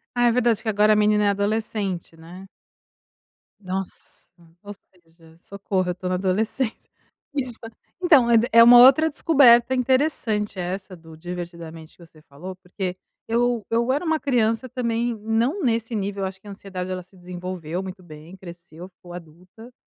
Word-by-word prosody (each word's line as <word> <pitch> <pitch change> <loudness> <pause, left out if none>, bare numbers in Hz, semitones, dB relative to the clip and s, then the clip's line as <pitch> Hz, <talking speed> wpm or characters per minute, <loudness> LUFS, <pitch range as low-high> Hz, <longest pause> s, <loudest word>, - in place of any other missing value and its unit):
Ah, 245 0 +3
é - - +4
verdade. 235 -3 +1
Que 220 - -3
agora, 210 +1 +3
a - - +2
menina 210 0 +2
é - - +3
adolescente, 200 -4 -3
né. 175 +4 -13 1.1
Nossa, 185 -2 -8 0.3
ou 205 0 -8 0.3
seja, 165 0 -22
socorro 190 -1 -3
eu - - +1
estou 180 0 -6
na 185 - 0
adolescência. 215 +6 -2 0.5
Isso, 255 -4 -2 0.5
então 285 -9 +5
é 235 - +5 0.2
é 230 +1 +8
uma 240 +1 +9
outra 275 +6 +7
descoberta 260 -5 +4
interessante 250 -6 0
essa 185 +1 -5
do 160 -1 -15
divertidamente 170 -2 -9
que 170 - -15
você 155 -1 -21
falou, 175 +7 -10
porque 185 0 -6 0.3
eu 235 -1 0
eu 235 +2 +1
era 295 +6 -1
uma 315 -1 0
criança 240 -2 0
também, 235 -1 -2
não 230 - -1
nesse 230 -1 -1
nível, 200 -1 -3
eu - - 0
acho 190 0 -9
que 210 - -16
a - - -8
ansiedade 185 -2 -7
ela 185 0 -4
se 185 +1 -23
desenvolveu 180 -1 -6
muito 190 -1 -9
bem, 155 +2 -13
cresceu, 175 -1 -12
ficou 175 -1 -15
adulta, 180 +8 -13
200 Hz, 165 wpm, -23 LUFS, 180-235 Hz, 1.1 s, uma